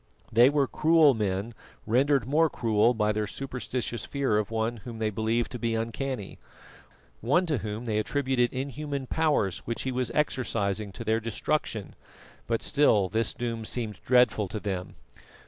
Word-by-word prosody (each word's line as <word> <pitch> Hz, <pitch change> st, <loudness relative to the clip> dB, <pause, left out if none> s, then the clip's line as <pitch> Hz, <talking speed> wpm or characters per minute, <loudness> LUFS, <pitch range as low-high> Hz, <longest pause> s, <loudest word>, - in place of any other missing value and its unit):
They 120 Hz, +3 st, +6 dB
were 145 Hz, -1 st, +2 dB
cruel 155 Hz, 0 st, +4 dB
men 105 Hz, 0 st, -2 dB, 0.3 s
rendered 130 Hz, +2 st, +2 dB
more 155 Hz, +5 st, +3 dB
cruel 115 Hz, 0 st, +2 dB
by 105 Hz, -1 st, +2 dB
their 105 Hz, 0 st, -1 dB
superstitious 125 Hz, -1 st, -4 dB
fear 135 Hz, -7 st, 0 dB
of 105 Hz, -, -2 dB
one 115 Hz, +1 st, -1 dB
whom 115 Hz, +1 st, -9 dB
they 110 Hz, -1 st, -1 dB
believed 110 Hz, +3 st, 0 dB
to 125 Hz, -, -6 dB
be 115 Hz, -1 st, 0 dB
uncanny; 115 Hz, -1 st, -4 dB, 0.8 s
one 160 Hz, -, +2 dB
to 150 Hz, -7 st, 0 dB
whom 105 Hz, +3 st, -5 dB
they 110 Hz, -2 st, 0 dB
attributed 130 Hz, 0 st, +1 dB
inhuman 140 Hz, +1 st, -4 dB
powers 145 Hz, -, +1 dB
which 115 Hz, -, -3 dB
he 130 Hz, -, -2 dB
was 125 Hz, -1 st, -1 dB
exercising 110 Hz, -8 st, -1 dB
to -, -, -7 dB
their 110 Hz, +1 st, +1 dB
destruction, 115 Hz, 0 st, -2 dB, 0.5 s
but 115 Hz, -1 st, -1 dB
still 110 Hz, -10 st, +3 dB
this 115 Hz, +3 st, 0 dB
doom 115 Hz, -2 st, -3 dB
seemed 110 Hz, -1 st, -3 dB
dreadful 125 Hz, -4 st, +3 dB
to 105 Hz, +4 st, -5 dB
them. 95 Hz, -3 st, -4 dB
115 Hz, 160 wpm, -27 LUFS, 110-135 Hz, 0.8 s, They